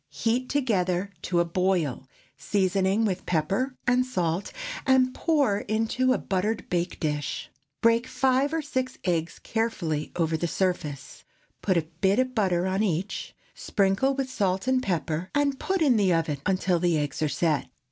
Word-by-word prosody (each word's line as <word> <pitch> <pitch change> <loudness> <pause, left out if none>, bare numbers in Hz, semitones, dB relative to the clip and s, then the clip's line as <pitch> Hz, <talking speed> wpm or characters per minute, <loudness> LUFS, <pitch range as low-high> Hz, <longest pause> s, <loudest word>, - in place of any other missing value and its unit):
Heat 225 - -1
together 200 -8 0
to 175 -1 0
a - - +1
boil, 170 -7 0 0.3
seasoning 195 +2 +1
with 190 -3 -2
pepper 195 - 0
and 250 0 +3
salt, 180 -7 -2 0.4
and 260 -1 +4
pour 280 -11 +2
into 225 +5 0
a 255 - +3
buttered 200 +4 -2
bake 175 0 -1
dish. 150 -3 -3 0.3
Break 230 +2 +3
five 265 +2 +2
or 325 -1 -1
six 260 -3 -2
eggs 170 -3 -1
carefully 175 -10 -2
over 160 -2 +1
the 170 - -1
surface; 155 -7 -2 0.4
put 185 -3 +2
a 165 - +2 0.2
bit 195 +1 +3
of 255 0 +1
butter 185 -6 +1
upon 190 +2 0
each; 190 -2 -2 0.2
sprinkle 200 +7 +1
with 265 -1 -2
salt, 190 -4 0
and 260 0 +3
pepper, 170 - -2
and 285 -1 +1
put 380 -3 0
in 260 -6 +4
the 195 -3 +3
oven 160 -4 -1
until 185 -2 +1
the 175 -2 +2
eggs 145 -1 -2
are 155 - +2
set. 155 -1 0
195 Hz, 160 wpm, -26 LUFS, 170-255 Hz, 0.4 s, and